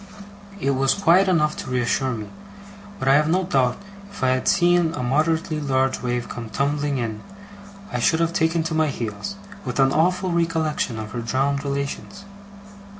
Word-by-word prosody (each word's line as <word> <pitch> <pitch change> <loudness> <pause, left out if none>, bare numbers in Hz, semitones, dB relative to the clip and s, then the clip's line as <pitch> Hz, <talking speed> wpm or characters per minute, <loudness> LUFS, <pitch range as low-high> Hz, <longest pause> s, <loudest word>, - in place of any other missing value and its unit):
It 140 - +1
was 135 0 +2
quiet 190 0 +4
enough 155 -4 +2
to - - -6
reassure 125 +1 0
me, 110 -2 -5 0.7
but 135 - -4
I 135 - +6
have 150 +2 +4
no 185 +3 +2
doubt 130 -8 +1 0.3
if 200 - -8
I 130 - +4
had 130 0 0
seen 175 -3 +3
a 125 - -3
moderately 155 +4 +1
large 135 -2 0
wave 120 -1 -2
come 115 -2 -7
tumbling 145 +2 -1
in, 110 -3 -3 0.7
I 125 - -1
should 160 +7 +2
have 165 0 +1
taken 160 0 +1
to 165 0 -3
my 160 0 +2
heels, 120 - -4 0.3
with - - -4
an 135 0 +4
awful 180 +3 +1
recollection 160 -7 0
of 110 -1 -6
her 120 - -4
drowned 135 +4 0
relations. 140 +8 -4
140 Hz, 175 wpm, -23 LUFS, 130-165 Hz, 0.7 s, I